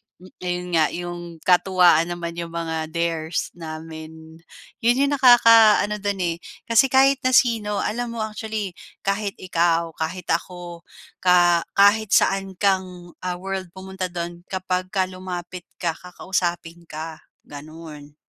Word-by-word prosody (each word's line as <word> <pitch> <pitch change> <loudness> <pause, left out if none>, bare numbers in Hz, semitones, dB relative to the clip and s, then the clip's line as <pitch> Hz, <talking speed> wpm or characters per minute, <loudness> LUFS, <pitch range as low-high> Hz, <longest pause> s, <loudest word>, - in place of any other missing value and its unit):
m 185 +1 -17
ayun 180 0 -3
nga, 160 -1 +5
yung 175 0 -5 0.2
katuwaan 180 -2 +4
naman 170 -1 -5
yung 170 - -4
mga 160 -1 -3
dares 165 -1 -2
namin. 160 0 -9 0.4
Yun 240 +3 +2
yung - - -1
nakakaano 230 -5 +6
dun, 200 -1 -2
eh, 170 -1 -1 0.3
kasi 230 +4 +4
kahit 270 +1 +4
na 255 0 +3
sino 220 -5 +2
alam 235 +2 -3
mo, 220 - -2
actually 215 -2 -4 0.3
kahit 200 0 -1
ikaw, 170 -2 +1
kahit 170 +3 -4
ako, 175 0 -4 0.4
ka 175 -2 +4
kahit 205 +1 +4
saan 195 -1 +1
kang, 185 -3 -1
ah, 180 -1 -2
world 190 0 -4
pumunta 190 0 -5
dun 175 0 -6
kapag 185 -1 -2
ka 190 -2 +1
lumapit 180 -1 -7
ka, 170 - 0
kakausapin 175 -2 -4
ka, 160 +1 -7 0.3
ganun. 150 0 -11
180 Hz, 135 wpm, -22 LUFS, 170-200 Hz, 0.4 s, nakakaano